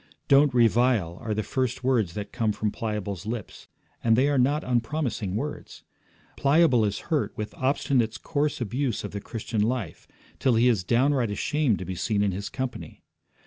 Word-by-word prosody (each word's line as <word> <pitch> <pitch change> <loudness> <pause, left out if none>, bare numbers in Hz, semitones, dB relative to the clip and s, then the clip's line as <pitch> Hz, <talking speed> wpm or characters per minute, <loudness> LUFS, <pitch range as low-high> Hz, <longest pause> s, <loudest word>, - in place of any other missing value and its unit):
'Don't 140 +1 +5
revile,' 115 -7 +2
are 110 -3 -2
the 110 - -1
first 130 +1 -2
words 115 -9 +1
that 105 -1 -5
come 115 -3 0
from 105 0 -2
Pliable's 105 -4 -4
lips, 115 -2 -6 0.4
and 115 -1 +4
they 130 +4 +3
are 140 -2 +2
not 145 +5 +2
unpromising 120 -5 -1
words. 145 +6 -5 0.5
Pliable 140 -4 +4
is 100 +10 -4
hurt 150 - 0
with 105 0 -4
Obstinate's 130 -4 0
coarse 145 +4 -1
abuse 120 +1 -2
of 105 - -5
the 100 - -5
Christian 110 0 -3
life, 110 -6 -2 0.3
till 130 -3 +3
he 115 +2 +4
is 110 -7 +2
downright 125 +3 +2
ashamed 125 +3 0
to 90 - -6
be 95 - -4
seen 105 +3 0
in 100 - +1
his 100 +2 -5
company. 130 -2 -6
115 Hz, 175 wpm, -26 LUFS, 105-130 Hz, 0.5 s, Don't